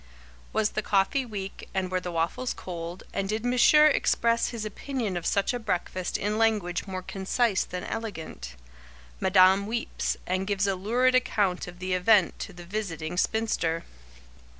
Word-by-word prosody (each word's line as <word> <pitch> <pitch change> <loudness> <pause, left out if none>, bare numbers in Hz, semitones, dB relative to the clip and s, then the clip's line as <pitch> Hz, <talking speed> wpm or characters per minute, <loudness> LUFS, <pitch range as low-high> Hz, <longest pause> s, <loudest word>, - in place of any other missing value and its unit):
Was 215 -1 +1
the 215 - -1
coffee 210 +6 +1
weak 195 -3 -7
and 185 -1 -1
were 185 - +1
the 180 -1 -5
waffles 170 +10 -1
cold, 170 0 -6
and 195 0 -2
did 215 +2 -2
Monsieur 250 +5 +6
express 235 -5 +3
his 230 -3 -5
opinion 220 -1 -3
of 175 -1 -2
such 200 +4 +1
a 245 - -2
breakfast 185 -3 -2
in 210 +2 -1
language 210 -5 +1
more 185 -1 -5
concise 195 +3 0
than 180 0 -6
elegant? 165 - -6 0.6
Madame 190 +1 +5
weeps, 230 +1 -2
and 185 +1 -1
gives 200 -1 +1
a 195 - +1
lurid 240 +7 +2
account 205 -8 +1
of 180 0 -10
the 185 0 -2
event 185 +1 +3
to - - -5
the 175 -1 -11
visiting 175 -4 -4
spinster. 180 -5 0
195 Hz, 160 wpm, -27 LUFS, 180-225 Hz, 0.6 s, Monsieur